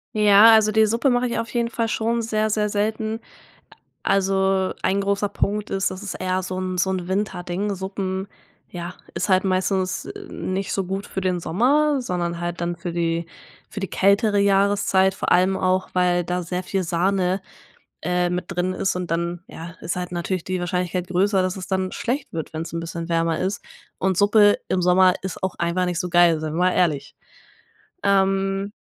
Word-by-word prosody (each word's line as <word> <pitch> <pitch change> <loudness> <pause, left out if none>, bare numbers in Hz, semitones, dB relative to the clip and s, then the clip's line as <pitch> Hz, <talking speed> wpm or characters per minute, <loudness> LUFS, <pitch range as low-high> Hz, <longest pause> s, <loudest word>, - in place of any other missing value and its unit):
Ja, 210 +1 +7
also, 215 -1 +5
die 220 +1 +4
Suppe 230 +6 +1
mache 245 0 +2
ich 235 - -2
auf 230 0 -5
jeden 235 -1 0
Fall 230 -1 -1
schon 230 +1 0
sehr, 215 -1 0
sehr 210 0 0
selten. 215 +2 -1 0.8
A - - +1
also, 190 -1 +1
ein 195 +2 +1
großer 200 +1 0
Punkt 210 +1 -2
ist, 195 -1 0
dass 185 +2 -7
es 205 - -5
eher 185 0 -1
so 185 0 -4
'n 185 -1 -3
so 190 +2 +2
'n 185 -2 -2
Winterding, 195 0 -2
Suppen, 190 0 -4 0.4
ja, 175 0 -6 0.2
ist - - -2
halt 185 0 +3
meistens, 185 0 0
äh, - - -8
nicht 190 +1 -3
so 195 - -1
gut 195 +2 -4
für 190 - -4
den 185 -1 0
Sommer, 275 - +2
sondern 175 -6 -3
halt 175 0 -4
dann 175 0 -2
für 170 +1 -5
die 165 0 -1 0.4
für 205 - -7
die 195 - -3
kältere 200 +2 +3
Jahreszeit, 195 -1 +3
vor - - -3
allem 185 +2 +3
auch, 185 0 0
weil 180 -1 +2
da 180 +1 -2
sehr 180 +2 -3
viel 190 +1 -2
Sahne, 185 +2 0 0.6
äh, 180 +1 +1
mit 180 0 -2
drin 185 0 -1
ist 190 0 -1
und 180 -1 -4
dann 170 +1 -2
ja, 170 +2 -9
ist 170 - -3
halt 180 0 -4
natürlich 175 0 -2
die 185 0 -2
Wahrscheinlichkeit 180 0 -2
größer, 190 +2 +2
dass 185 0 -1
es 185 -2 -7
dann 190 -1 -1
schlecht 260 +4 -3
wird, 160 -2 -4
wenn's 165 +1 -5
'n 165 - -2
bisschen 165 0 -5
wärmer 165 -1 +1
ist. 190 +2 -2 0.4
Und 190 -2 0
Suppe 205 +1 +5
im 185 - 0
Sommer 180 +1 +5
ist 190 -1 -6
auch 190 - -1
einfach 175 +2 0
nicht 175 -1 -2
so 180 - -3
geil, 175 -2 +5
sein 155 -1 -3
wir - - -3
mal 180 +1 +3
ehrlich, 150 -5 0 0.9
ähm. 195 0 +1
185 Hz, 195 wpm, -23 LUFS, 180-200 Hz, 0.9 s, Ja